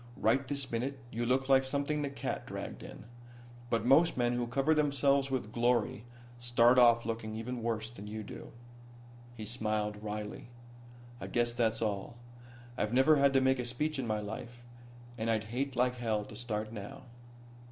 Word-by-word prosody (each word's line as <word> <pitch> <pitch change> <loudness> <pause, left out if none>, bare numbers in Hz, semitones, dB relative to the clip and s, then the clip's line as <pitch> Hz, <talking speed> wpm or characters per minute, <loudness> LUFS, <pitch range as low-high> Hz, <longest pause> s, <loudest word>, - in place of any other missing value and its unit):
Right 135 -1 +2
this 140 -2 -4
minute 130 +4 -2
you 120 +1 -2
look 130 +1 +2
like 135 -1 +5
something 140 +2 -1
the 145 - -1
cat 140 - -4
dragged - - -6
in. - - -10 0.6
But 115 -2 0
most 155 +6 +5
men 120 -1 +2
who 120 0 -1
cover 135 +6 +2
themselves 140 -2 +2
with 130 -5 -2
glory 120 -2 +1 0.3
start 120 +1 +5
off 120 -1 +6
looking 115 -1 -3
even 120 +2 -4
worse 115 -1 -2
than 105 -3 -10
you 110 +1 -5
do." - - -9 0.8
He 110 -2 -7
smiled 105 -2 -2
wryly. 105 +1 -5 0.7
"I - - -6
guess 120 0 0
that's 115 -2 +1
all. 105 +1 -3 0.6
I've 105 +1 0
never 135 +4 +5
had 140 0 +5
to 135 - +4
make 130 0 +3
a - - 0
speech 135 +5 -2
in 125 - -2
my 110 -1 0
life, 120 +3 -7 0.5
and 110 +1 -1
I'd 110 -2 +1
hate 135 +1 -1
like 125 +1 +1
hell 110 -3 -1
to 105 - -11
start 110 -1 -3
now." 105 +4 -8
120 Hz, 175 wpm, -32 LUFS, 110-130 Hz, 0.8 s, off